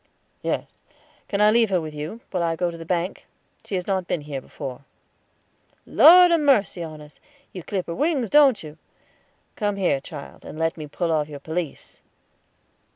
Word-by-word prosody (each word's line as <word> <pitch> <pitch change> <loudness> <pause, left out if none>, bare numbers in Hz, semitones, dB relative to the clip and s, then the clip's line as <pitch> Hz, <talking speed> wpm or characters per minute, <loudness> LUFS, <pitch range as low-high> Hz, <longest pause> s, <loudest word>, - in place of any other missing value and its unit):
"Yes; - - -2 0.6
can 200 0 -1
I 210 0 +6
leave 230 -1 +3
her 185 -2 +2
with 155 -2 -6
you, 155 +10 -6
while 180 - -1
I 165 -1 0
go 175 +1 -1
to 170 - -9
the 165 - -8
bank? 180 +1 -2 0.4
She 200 - -5
has 180 -1 -2
not 190 -3 -1
been 170 - -1
here 145 -2 -6
before." 130 0 -8 1.0
"Lord 355 +2 +8
ha' 335 - +4
mercy 255 - +2
on 155 -2 -7
us; 150 0 -14 0.3
you 185 - -6
clip 185 +1 -3
her 170 - -5
wings, 280 - 0
don't 280 - +5
you? 155 0 -11 0.8
Come 205 -2 -1
here, 175 -8 +1
child, 145 0 -10
and - - -9
let 165 0 0
me 155 -2 -8
pull 165 +3 -2
off 155 -1 0
your 145 -1 -8
pelisse." 160 +1 -6
175 Hz, 185 wpm, -23 LUFS, 155-210 Hz, 1.0 s, Lord